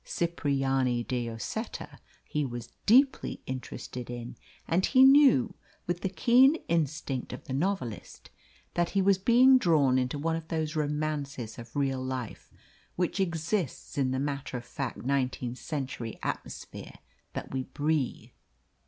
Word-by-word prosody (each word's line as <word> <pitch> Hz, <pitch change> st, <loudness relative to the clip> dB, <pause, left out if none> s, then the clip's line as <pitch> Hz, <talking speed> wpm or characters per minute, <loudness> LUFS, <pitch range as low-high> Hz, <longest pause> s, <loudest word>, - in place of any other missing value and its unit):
Cipriani 135 Hz, -7 st, 0 dB
de 120 Hz, -1 st, -2 dB
Lloseta 115 Hz, -2 st, -5 dB, 0.3 s
he 150 Hz, -, -1 dB
was 120 Hz, -3 st, -6 dB, 0.2 s
deeply 260 Hz, +5 st, +4 dB
interested 125 Hz, -1 st, -6 dB
in, 120 Hz, -1 st, -6 dB, 0.3 s
and 175 Hz, +3 st, +2 dB
he 260 Hz, +4 st, +5 dB
knew, 270 Hz, -, +6 dB, 0.3 s
with 175 Hz, +1 st, -2 dB
the 195 Hz, -, -1 dB
keen 245 Hz, -, +5 dB
instinct 155 Hz, -5 st, -1 dB
of -, -, -7 dB
the 145 Hz, -6 st, -6 dB
novelist, 145 Hz, -, -3 dB, 0.4 s
that 175 Hz, -1 st, +1 dB
he -, -, +5 dB
was 195 Hz, -1 st, +4 dB
being 255 Hz, +5 st, +6 dB
drawn 145 Hz, -, +3 dB
into 130 Hz, +3 st, -1 dB
one 160 Hz, +3 st, 0 dB
of 165 Hz, 0 st, -6 dB
those 160 Hz, -2 st, -2 dB
romances 145 Hz, -6 st, -2 dB
of 115 Hz, 0 st, -11 dB
real 135 Hz, -2 st, 0 dB
life 130 Hz, -3 st, -5 dB, 0.4 s
which 180 Hz, +2 st, -1 dB
exists 170 Hz, -, -2 dB
in 135 Hz, -2 st, +1 dB
the 130 Hz, -, -1 dB
matter 140 Hz, -1 st, -3 dB
of 120 Hz, -, -8 dB
fact 130 Hz, +1 st, -4 dB
nineteenth 130 Hz, -2 st, -1 dB
century 130 Hz, -7 st, -4 dB
atmosphere -, -, -6 dB, 0.4 s
that -, -, -6 dB
we 130 Hz, -1 st, -2 dB
breathe. 145 Hz, -1 st, -1 dB
145 Hz, 140 wpm, -29 LUFS, 130-170 Hz, 0.4 s, knew